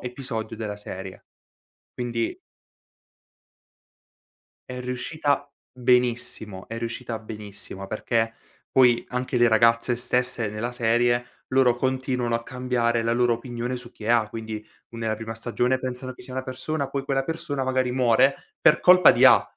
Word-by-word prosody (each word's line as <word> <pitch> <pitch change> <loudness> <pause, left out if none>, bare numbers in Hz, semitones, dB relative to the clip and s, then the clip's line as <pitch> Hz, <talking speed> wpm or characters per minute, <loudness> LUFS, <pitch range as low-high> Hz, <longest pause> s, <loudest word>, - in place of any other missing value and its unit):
episodio 125 -3 -5
della 105 -2 -4
serie. 95 -2 -8 0.7
Quindi 120 -2 -3 2.3
è 125 - -5
riuscita 145 +3 -1 0.2
benissimo, 125 -5 0
è 115 - -5
riuscita 115 0 -4
benissimo, 100 -3 -8
perché 115 +2 -1 0.4
poi 125 -3 +5
anche 125 +1 -3
le 120 0 +5
ragazze 115 +2 +4
stesse, 125 -1 0
nella 110 +3 -3
serie, 120 +1 +2 0.2
loro 130 -2 +3
continuano 130 -2 -1
a 115 - -4
cambiare 120 -2 0
la 115 0 0
loro 120 0 +3
opinione 120 +1 -4
su 125 -1 -9
chi - - -14
è 110 - -3
A. 115 -3 +3
Quindi 110 -1 -6 0.3
u 115 - -10
nella 110 -1 -1
prima 110 +1 -6
stagione 120 +3 0
pensano 130 0 -5
che - - -14
sia 125 +1 -7
una 130 0 -3
persona, 140 +3 -3
poi 140 0 -3
quella 135 -1 0
persona 145 -3 -3
magari 130 -1 0
muore, 130 +2 +4 0.3
per 150 - +5
colpa 180 -1 +7
di - - +5
A. - - +8
120 Hz, 145 wpm, -25 LUFS, 115-130 Hz, 2.3 s, A